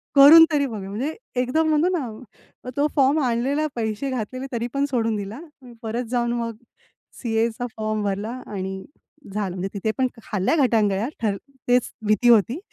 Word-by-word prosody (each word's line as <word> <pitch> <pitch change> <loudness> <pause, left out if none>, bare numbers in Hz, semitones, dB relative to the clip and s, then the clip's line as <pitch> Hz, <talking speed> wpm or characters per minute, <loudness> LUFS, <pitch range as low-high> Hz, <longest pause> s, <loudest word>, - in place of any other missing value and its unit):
करून 300 +4 +10
तरी 290 -2 +2
बघू. 215 -7 -5
म्हणजे 245 +10 -3 0.3
एकदम 315 +6 +1
म्हणतो 310 +3 +3
ना, 245 -2 -9
तो 290 +1 +3
फॉर्म 280 +2 +4
आणलेला 260 +5 0
पैसे 225 +3 -2
घातलेले, 255 +1 -4
तरी 235 -1 -2
पण 280 0 +1
सोडून 230 -4 0
दिला. 205 +4 -5 0.4
परत 230 +2 -2
जाऊन 240 -1 +1
मग 230 -1 -3 0.7
सी-एचा 230 +1 0
फॉर्म 215 -1 -1
भरला 200 +2 -2 0.2
आणि 190 -1 -4 0.5
झालं. 200 -3 -2
म्हणजे 190 +1 -3
तिथे 210 +2 -1
पण 260 -1 +2 0.2
खाल्ल्या 200 - 0
घटांगळ्या, 215 -2 +1 0.2
तर 205 -3 +1 0.3
तेच 245 0 +2 0.2
भीती 215 +3 +3
होती. 235 - +4
235 Hz, 155 wpm, -23 LUFS, 210-265 Hz, 0.7 s, करून